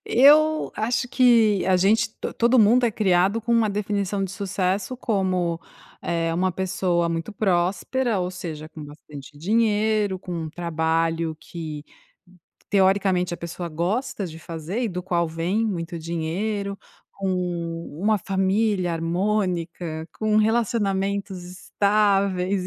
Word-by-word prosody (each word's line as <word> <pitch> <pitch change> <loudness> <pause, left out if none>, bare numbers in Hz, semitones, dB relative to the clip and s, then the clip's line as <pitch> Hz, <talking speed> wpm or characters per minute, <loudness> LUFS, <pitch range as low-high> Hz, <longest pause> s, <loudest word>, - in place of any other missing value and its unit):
eu 305 +5 +5
acho 240 +3 0
que 230 -6 +4
a 185 -1 +4
gente 215 +4 +2
to - - -4
todo 240 +2 +3
mundo 235 +3 +5
é 235 - +3
criado 195 +1 +2
com 235 +2 -1
uma 225 -3 +3
definição 200 -1 -1
de 190 - -3
sucesso 195 +3 -2
como, 185 -7 0 0.4
eh, 165 -1 -1
uma 185 +1 +1
pessoa 180 -2 0
muito 165 +5 -3
próspera, 200 +5 0
ou 180 0 -2
seja, 160 -4 -7
com 155 -2 -10
bastante 145 -1 -12
dinheiro, 210 +1 +1
com 180 -1 -8
um 155 - -5
trabalho 165 -1 -1
que, 155 -3 -7 0.9
teoricamente 190 -2 +2
a - - -7
pessoa 170 +1 -6
gosta 200 - -2
de 160 -1 -9
fazer, 170 +7 -5
e 235 - 0
do 180 -2 -4
qual 175 -2 0
vem 175 +8 -1
muito 170 -3 -3
dinheiro. 195 +5 -3 0.4
Com 170 -4 -3
uma 215 +2 +3
família 195 0 0
harmônica. 170 -2 -2
Com 215 -1 +1
relacionamentos 200 -4 0
estáveis, 195 0 +1
190 Hz, 130 wpm, -24 LUFS, 170-210 Hz, 0.9 s, eu